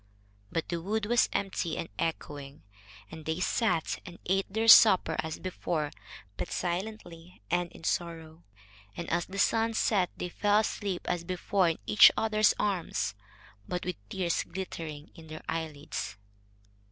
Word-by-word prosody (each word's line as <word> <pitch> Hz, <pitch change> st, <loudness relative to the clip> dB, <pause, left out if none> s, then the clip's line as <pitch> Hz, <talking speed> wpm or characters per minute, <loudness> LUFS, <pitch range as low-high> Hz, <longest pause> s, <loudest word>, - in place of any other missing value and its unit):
But 165 Hz, -, -2 dB
the 170 Hz, -1 st, -2 dB
wood 210 Hz, +4 st, -1 dB
was 240 Hz, +2 st, +3 dB
empty 190 Hz, -4 st, -2 dB
and -, -, -3 dB
echoing, 145 Hz, -3 st, -4 dB, 0.5 s
and 160 Hz, 0 st, -9 dB
they 160 Hz, +2 st, -2 dB
sat 185 Hz, -3 st, 0 dB
and 175 Hz, -1 st, -10 dB
ate 195 Hz, +1 st, 0 dB
their 220 Hz, +2 st, 0 dB
supper 190 Hz, -7 st, +8 dB
as 160 Hz, -1 st, -3 dB
before, 170 Hz, -5 st, -3 dB, 0.5 s
but -, -, -4 dB
silently 180 Hz, -2 st, -5 dB
and 175 Hz, 0 st, 0 dB
in -, -, -14 dB
sorrow, 165 Hz, -1 st, -3 dB, 0.5 s
and 170 Hz, -, -4 dB
as 175 Hz, +1 st, 0 dB
the 195 Hz, -, -8 dB
sun 225 Hz, +3 st, +2 dB
set 190 Hz, -5 st, +2 dB
they 180 Hz, -, -4 dB
fell 205 Hz, +3 st, +3 dB
asleep 200 Hz, -4 st, -3 dB
as 175 Hz, -1 st, -1 dB
before 185 Hz, +1 st, +1 dB
in 165 Hz, -, -3 dB
each 105 Hz, -1 st, +8 dB
other's 215 Hz, -1 st, +3 dB
arms, 170 Hz, -, -1 dB, 0.5 s
but 180 Hz, -, -3 dB
with 180 Hz, -2 st, -3 dB
tears 175 Hz, -3 st, 0 dB
glittering 160 Hz, -5 st, -7 dB
on 160 Hz, -, -13 dB
their 155 Hz, 0 st, -9 dB
eyelids. 155 Hz, -8 st, -4 dB
175 Hz, 150 wpm, -29 LUFS, 160-195 Hz, 0.5 s, supper